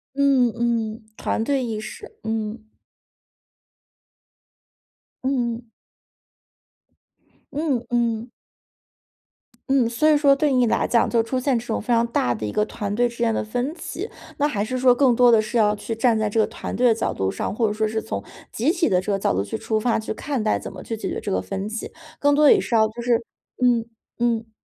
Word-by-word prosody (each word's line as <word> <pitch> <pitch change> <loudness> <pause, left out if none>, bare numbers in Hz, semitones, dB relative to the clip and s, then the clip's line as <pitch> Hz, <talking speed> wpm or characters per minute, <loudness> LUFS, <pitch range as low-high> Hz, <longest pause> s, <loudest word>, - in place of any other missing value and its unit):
嗯 275 -3 +4
嗯。 230 -2 -1
团 - - -1
队 270 0 0
意 220 -3 -3
识。 215 +1 -10
嗯。 220 0 -4 2.5
嗯。 240 -3 -1 1.8
嗯 280 -5 -1
嗯。 235 -1 0 1.4
嗯， 265 -3 +3
所 305 +7 +2
以 305 - +5
说 285 -1 +5
对 285 +1 +1
你 250 -2 +3
来 - - +1
讲， 235 - +2
就 230 -1 +2
出 230 +3 -2
现 255 0 +1
这 230 - -7
种 225 - -1
非 220 - -13
常 230 0 +3
大 125 - +1
的 110 - -6
一 105 - -2
个 210 - +1
团 205 -2 -4
队 245 +2 +2
之 235 - -12
间 235 -1 +2
的 - - -1
分 245 +6 -2
歧， - - -5 0.3
那 290 0 +2
还 210 -8 -1
是 255 +4 -3
说 255 0 +5
更 255 -1 +4
多 245 +1 +6
地 225 -2 +6
是 215 +3 -4
要 210 -2 +4
去 225 +2 -4
站 225 0 +2
在 215 -1 +1
这 220 +2 +1
个 215 - +3
团 - - -6
队 250 - +2
的 230 - +4
角 225 - -2
度 95 0 -1
上， - - -3
或 225 +1 +1
者 - - -1
说 215 +1 0
是 220 +1 -2
从 100 0 -4 0.3
集 265 +9 +1
体 350 -2 +1
的 185 -4 +3
这 195 +2 -2
个 195 - +1
角 - - +1
度 95 +2 0
去 100 - -4
出 220 - -1
发， 230 +2 +1
去 220 - -4
看 275 0 -3
待 215 - +1
怎 - - -8
么 185 -1 -9
去 225 - -4
解 220 - -4
决 - - -3
这 - - -4
个 95 - +1
分 190 - -4
歧， 220 +1 -5 0.3
更 285 0 +3
多 300 +1 +5
地 - - +8
也 - - +2
是 240 - -3
要 220 -1 +5
就 225 +2 -9
是 235 -1 +1 0.4
嗯 240 -2 +3 0.3
嗯。 230 -2 0
230 Hz, 225 characters per minute, -23 LUFS, 215-250 Hz, 2.5 s, 地